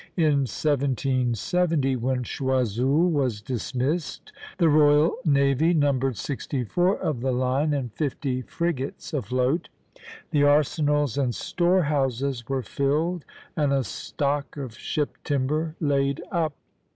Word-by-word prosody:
In 145 -5 +3
1770, 135 - 0
when 125 +1 -1
Choiseul 130 - +1
was 130 -8 0
dismissed, 130 +6 -3 0.2
the 170 -3 +4
royal 150 +1 +5
navy 140 +3 +3
numbered 135 -5 +1
sixty 135 0 -3
four 180 - +1
of 140 -7 -2
the 130 +1 0
line 130 +4 +1
and 130 -6 -2
fifty 135 -3 -2
frigates 170 +1 -3
afloat. 130 - 0 0.6
The 145 - +2
arsenals 145 -2 +2
and 125 -4 0
storehouses 140 -8 0
were 135 -2 -1
filled, 150 +7 -1 0.3
and 145 -3 +1
a 135 -1 +2
stock 140 +6 -3
of 130 -5 -5
ship 150 -2 -3
timber 150 +3 -1
laid 140 -2 +1
up. 165 -4 0
140 Hz, 115 wpm, -25 LUFS, 130-150 Hz, 0.6 s, royal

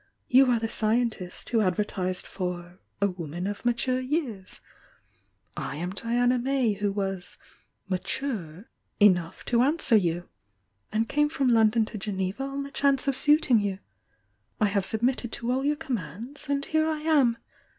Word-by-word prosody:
You 260 +1 +6
are 240 - +4
the 225 - -2
scien 225 +2 +1
tist 180 -4 -9
who 230 -2 +2
advertised 185 -1 -1
for 180 -1 -5 0.2
'a - - +5
woman 175 -2 -5
of 205 +1 -4
mature 245 +1 +1
years,' 255 - -3 0.6
— - - -42 0.2
I - - -5
am 175 +4 -3
Diana 245 +4 +1
May 255 -3 +1
who 205 0 -1
was 195 -2 -4 0.5
'mature' 190 - -3 0.3
enough 180 -5 +3
to 235 -1 +2
answer 280 -2 +3
you, 175 -3 +1 0.6
and 220 +2 0
came 295 +3 +2
from 275 -4 +1
London 225 -1 +4
to 215 -1 -7
Geneva 195 +2 -3
on 275 +1 -3
the 280 - -9
chance 275 -1 +1
of 275 - +2
suiting 295 -6 +4
you, 200 -2 -2 0.4
— 105 +2 -45
I 215 - +4
have 200 -1 +1
submitted 240 +2 0
to 235 +1 -2
all 260 +1 0
yo"r 295 +1 +2
commands, 245 - -6
and 280 0 0
here 315 0 +1
I 310 -1 -2
am! 285 -7 +3
225 Hz, 165 wpm, -27 LUFS, 190-265 Hz, 0.6 s, You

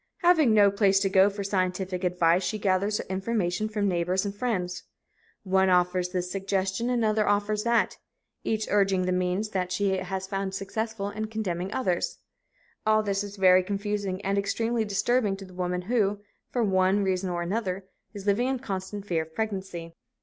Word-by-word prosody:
Having 315 -10 +5
no 205 -1 +6
place 195 -1 +3
to 195 - +2
go 195 +1 +6
for 200 0 -5
scientific 185 -1 -1
advice, 180 -1 +3
she 215 - -2
gathers 200 +1 +1
her - - -4
information 195 +1 -1
from 210 -1 0
neighbors 180 +1 0
and 200 - -3
friends. 200 -5 -2 0.6
One 190 -1 +3
offers 180 0 +2
this 180 -1 -3
suggestion, 195 +3 -1
another 220 -3 +1
offers 205 +1 +1
that, 235 0 +2 0.4
each 220 -1 -1
urging 195 -2 +3
the 185 - 0
means 180 +3 0
that 185 -3 -2
she 200 +2 +1
has 190 +1 -4
found 195 0 -3
successful 205 +1 -3
and 215 +1 -4
condemning 190 -4 -3
others. 190 -8 -1 0.7
All 215 0 +3
this 200 -1 -1
is 205 0 -8
very 185 -1 +6
confusing 200 0 -2
and 200 +1 +1
extremely 225 +3 0
disturbing 205 0 +1
to 195 - -9
the 185 - -14
woman 180 0 -2
who, 205 -1 +1 0.3
for 245 - 0
one 190 0 +2
reason 190 -1 0
or 175 -1 -2
another, 190 0 -2 0.3
is 200 -3 -9
living 210 +5 +2
in 265 0 0
constant 200 -4 -5
fear 170 -5 0
of 160 0 -10
pregnancy. 190 -6 -4
195 Hz, 175 wpm, -27 LUFS, 185-210 Hz, 0.7 s, no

